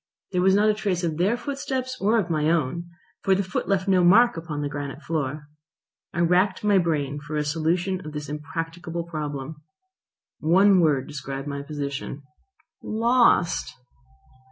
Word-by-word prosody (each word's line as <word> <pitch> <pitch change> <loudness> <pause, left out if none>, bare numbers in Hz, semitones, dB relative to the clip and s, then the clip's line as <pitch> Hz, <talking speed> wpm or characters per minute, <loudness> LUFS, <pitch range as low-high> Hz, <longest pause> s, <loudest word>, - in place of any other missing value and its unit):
There 180 -2 +1
was 190 +1 +4
not 210 +1 +4
a 215 - +4
trace 195 -4 -2
of 160 -3 -1
their 195 +7 +2
footsteps 265 -2 -3
or 215 +4 +3
of 205 -6 +1
my 155 -1 +1
own, 170 +1 0 0.3
for 195 -1 +3
the 200 - 0
foot 185 - -3
left 195 -1 +1
no 185 -2 +4
mark 225 +8 +6
upon 160 -3 -4
the - - -1
granite 145 0 -6
floor. 150 -2 -3 0.6
I 170 - -2
racked 180 +3 +2
my 205 -2 +4
brain 150 -5 -1
for 150 +1 -7
a 150 - +1
solution 170 +5 0
of 155 - -7
this 150 -1 -6
impracticable 165 +3 -5
problem. 150 -2 -5 0.8
One 190 +4 +5
word 145 -6 +2
described 135 -1 -6
my 140 -1 -4
position. 140 -1 -5 0.6
Lost! 230 -5 +2
165 Hz, 160 wpm, -25 LUFS, 150-190 Hz, 0.8 s, mark